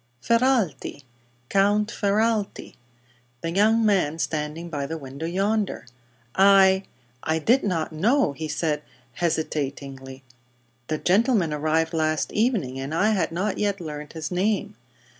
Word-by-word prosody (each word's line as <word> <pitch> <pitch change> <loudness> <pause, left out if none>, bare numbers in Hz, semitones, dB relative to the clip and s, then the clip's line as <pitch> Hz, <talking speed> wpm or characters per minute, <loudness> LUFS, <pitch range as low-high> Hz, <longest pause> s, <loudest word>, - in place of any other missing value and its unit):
"Ferralti 230 - +1 0.4
Count 205 - +2
Ferralti. 215 0 0 0.7
The 165 - -3
young 220 +5 +3
man 180 -7 +2
standing 155 +1 -3
by 145 -4 -3
the 165 - -4
window, 140 +2 -6
yonder." 200 +2 -1 0.5
"I 195 0 +5 0.4
I 160 0 0
did 240 - +3
not 170 -6 -1
know," 220 - +2
he 155 +3 -5
said, 150 -1 -1 0.3
hesitatingly. 140 -4 -3 0.6
"The 155 - -1
gentleman 195 - +2
arrived 160 +2 0
last 155 -1 0
evening, 210 - 0
and 135 +4 -4
I 210 +6 +3
had 185 -7 0
not 190 +4 -2
yet 200 -1 0
learned 150 -3 -7
his 160 0 -5
name. 205 +3 0
170 Hz, 125 wpm, -24 LUFS, 155-205 Hz, 0.7 s, I